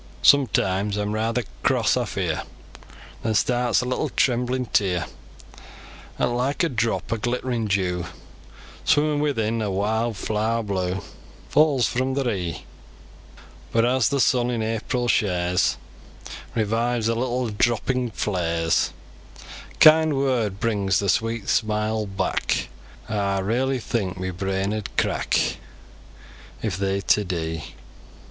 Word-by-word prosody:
Sometimes 100 -7 +3
aw'm 105 0 -1
rayther 115 +3 0 0.2
cross? - - +2
aw - - 0
fear! - - -2 0.8
Then 110 -1 -1
starts 120 +1 +2
a - - -4
little 125 0 -1
tremblin 125 0 +1
tear, 90 -7 +1 1.1
'At, - - +1
like 125 +6 0
a 170 - +2
drop 110 - -1
o' - - -1
glitt'rin 120 0 -2
dew 90 -3 0 0.8
Swimmin 150 -1 +2
within 115 -6 0
a 105 - -1
wild 110 +4 0
flaar 110 +3 -1
blue, 95 -2 -2 0.5
Falls 145 -6 +4
fro 130 +5 -1
ther 135 -3 0
e'e; 90 -5 -4 1.1
But 115 0 +3
as 125 -2 +2
the 140 - 0
sun 125 -1 +3
in 115 -2 -1
April 115 +3 -1
shaars 90 -4 +1 0.8
Revives 115 +1 0
the 115 - +2
little 125 0 -1
droopin 120 +3 0
flaars, 85 -6 0 0.8
A - - -18
kind 155 -2 +6
word 120 -8 0
brings 100 -4 +1
ther 100 - 0
sweet 115 0 0
smile 110 -1 0
back: 95 0 -1 0.4
Aw 100 -2 0
raylee 130 +7 0
think 100 -5 -2
mi 95 0 -2
brain 95 +2 -2
ud 105 -2 -4
crack - - +1 1.1
If 105 -6 -1
they'd 100 0 -1
ta 105 - +4
dee. 80 -4 -4
110 Hz, 125 wpm, -24 LUFS, 100-125 Hz, 1.1 s, kind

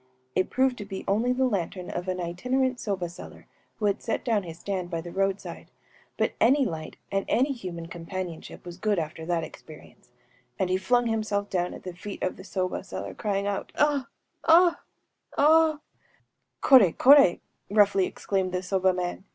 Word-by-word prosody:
It 185 - +1
proved 260 -2 +1
to 205 - -5
be 195 -1 -7
only 225 +5 +2
the 260 +1 +2
lantern 185 -5 -2
of 175 +1 -4
an 185 0 -2
itinerant 250 +9 -1
soba 190 -4 -2
seller, 170 - -12 0.3
who 215 - -3
had 205 +1 +1
set - - -3
down 225 -4 +2
his 165 -3 -9
stand 185 -1 -4
by 165 -2 -2
the 170 +1 -7
road 195 +1 0
side; - - -9 0.5
but - - +1
any 270 +4 +5
light 160 -6 -5
and 195 0 0
any 265 +4 +2
human 180 -8 -7
companionship 170 0 -7
was 175 +1 -9
good 210 -1 +1
after 160 0 -4
that 170 -2 0
experience; 155 -1 -13 0.5
and 185 -1 0
he 185 - +3
flung 245 +5 +2
himself 215 -3 -1
down 180 -1 -1
at - - -12
the 185 - -6
feet 195 +3 -7
of 185 - -1
the 190 - -10
soba 185 -2 -3
seller, - - -6
crying 200 -2 -2
out, 200 -1 -3
‚ÄúAh!‚ÄĒaa!!‚ÄĒ_aa!!!_‚ÄĚ... 315 +1 +2 0.8
“_Koré! 245 - +6
kor√©!_‚ÄĚ 275 -9 +7 0.3
(3) 205 - -5
roughly 200 -2 +5
exclaimed 190 -2 -2
the 180 0 -2
soba 190 0 +2
man. 180 +1 -3
195 Hz, 175 wpm, -27 LUFS, 180-240 Hz, 0.8 s, kor√©!_‚ÄĚ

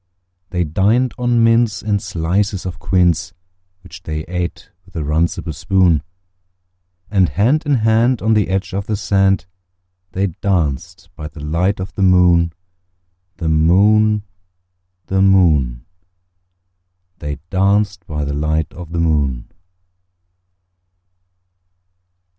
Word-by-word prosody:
They 90 0 -1
dined 105 +11 +1
on 120 -1 +2
mince 115 -1 +2
and 100 -2 0
slices 95 +4 -1
of 90 - -6
quince, 90 0 +1 0.5
Which 90 - -12
they 75 -2 -4
ate 90 0 -5
with 90 +1 -23
a 80 - -2
runcible 80 +3 -1
spoon; 90 -3 +2 1.1
And 95 -4 +3
hand 125 - +1
in 145 - +3
hand, 115 +2 +2
on 110 +1 +1
the 105 -2 +2
edge 95 0 -2
of 100 +1 -3
the 110 - -1
sand, 95 -1 +1 0.7
They 95 +2 0 0.2
danced 85 -1 -2
by 75 -2 -7
the 80 - -12
light 90 +6 0
of 95 -1 -6
the 100 - -5
moon, 90 -3 +4 0.9
The 85 -4 -3
moon, 105 +7 +3 0.8
The 95 +4 0
moon, 75 -11 +3 1.3
They 75 -2 -5
danced 100 +1 +1
by 75 -2 -3
the 70 - -3
light 75 +1 -1
of 85 -1 -10
the 85 - -1
moon. 70 -7 0
90 Hz, 120 wpm, -18 LUFS, 80-100 Hz, 1.3 s, moon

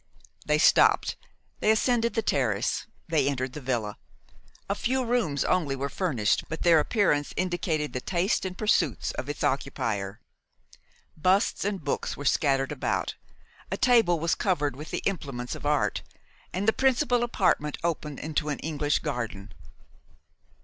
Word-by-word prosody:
They - - +3
stopped, - - +4 0.4
they - - +1
ascended 235 +1 +2
the 225 - +1
terrace, - - 0 0.2
they 150 -4 +2
entered 130 -2 -3
the 150 - -7
villa. 115 -6 -2 0.7
A 200 - +1
few 255 +5 -1
rooms 225 - 0
only 155 -7 +1
were 140 +1 -3
furnished, 135 - 0
but 160 - -4
their 170 -2 +6
appearance 150 -5 +1
indicated 175 -4 -1
the 125 - -3
taste 180 - 0
and 185 -1 -5
pursuits 180 - +1
of 130 - -6
its 145 - -4
occupier. 110 -7 -1 1.0
Busts 185 +6 +2
and 195 -4 -2
books 140 - -2
were 145 - -7
scattered 135 -1 +2
about; - - -1 0.6
a - - -1
table 230 -10 +4
was 165 +2 +1
covered 150 -9 0
with 150 +3 -8
the - - -3
implements 140 -10 -3
of - - -5
art; 145 -9 +1 0.5
and 195 +3 -2
the 220 - +5
principal 260 -1 +2
apartment 180 -10 +1
opened 150 -4 -2
into 150 0 -2
an 145 - -1
English 150 -2 0
garden. 115 -9 -4
155 Hz, 150 wpm, -27 LUFS, 140-195 Hz, 1.0 s, their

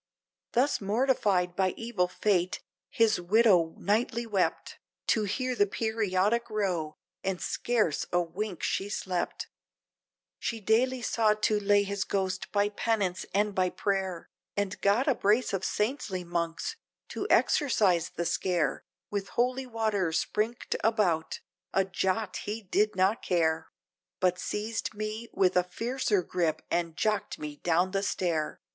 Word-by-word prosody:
Thus 260 +2 +2
mortified 200 -5 +1
by 190 -1 +1
evil 225 -6 0
fate, 180 -1 0 0.3
his 225 -5 +2
widow 180 -4 +4
nightly 230 +3 0
wept, 205 -5 -1 0.3
To 215 -2 +3
hear 255 +6 -1
the 205 -4 +3
periodic 220 +1 0
row, 180 -8 -1 0.3
and 190 -2 -1
scarce 220 -11 0
a 175 - +3
wink 180 +2 -4
she 195 - -1
slept; 185 -3 -2 0.9
She 230 - -2
daily 240 +4 +2
sought 215 -2 +2
to 210 -1 +3
lay 205 0 +4
his 200 -1 -2
ghost 190 -1 -2
by 205 0 +2
penance 205 -3 -1
and 205 +1 +1
by 185 -1 +2
prayer, 190 -3 -2 0.3
And 200 0 -2
got 205 +8 +3
a 275 - +5
brace 220 +1 +2
of 190 -1 -1
saintly 210 -5 -1
monks, 170 - -3 0.3
to - - -3
exorcise 195 - +3
the 170 - -4
scare 170 -6 0 0.3
With 200 -1 -2
holy 255 +2 +1
water 215 -7 0
sprinked 215 +8 -1
about, 185 -8 +1 0.3
a 195 - +4
jot 190 +1 -1
he 215 +2 -5
did 210 +2 +1
not 190 +4 +2
care! 160 -2 +1 0.5
But 180 -1 +2
seized 220 +1 -3
me 215 +2 -4
with 185 -1 +2
a 180 - +4
fiercer 220 +1 -1
grip, 165 -3 -1
and 170 -2 -1
jocked 210 -1 0
me 150 -1 -6
down 175 +4 +1
the 195 0 0
stair! 170 -5 -1
200 Hz, 140 wpm, -29 LUFS, 180-220 Hz, 0.9 s, a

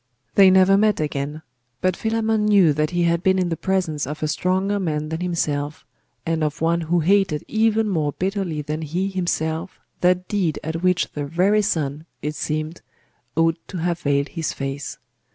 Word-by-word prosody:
They 195 -1 +7
never 190 +1 +5
met 215 0 +3
again. 150 +1 -3 0.4
But 185 -1 +1
Philammon 220 0 0
knew 195 -7 +5
that 150 +1 0
he 175 -1 0
had 170 0 +2
been 190 +1 +3
in 180 -2 +1
the 165 - -1
presence 165 -7 -1
of 150 +2 -5
a - - +1
stronger 190 +6 0
man 155 -4 -2
than 160 +2 -4
himself, 150 -4 -2 0.4
and 165 -1 0
of 150 0 -2
one 170 +1 +1
who 165 +1 +1
hated 190 -3 +2
even 220 0 +2
more 155 -7 0
bitterly 185 -5 -2
than 155 +2 -4
he 175 +6 -2
himself 175 -2 -2 0.2
that 180 0 +2
deed 185 -7 0
at 160 +2 -3
which 180 -1 +1
the 145 -1 -4
very 190 +7 +3
sun, 155 -5 -2 0.2
it 150 +1 -2
seemed, 155 +2 -3 0.5
ought 165 +1 +2
to 185 - -6
have 170 0 -1
veiled 140 -3 0
his 165 -3 -3
face. 135 0 -5
170 Hz, 180 wpm, -22 LUFS, 155-190 Hz, 0.5 s, They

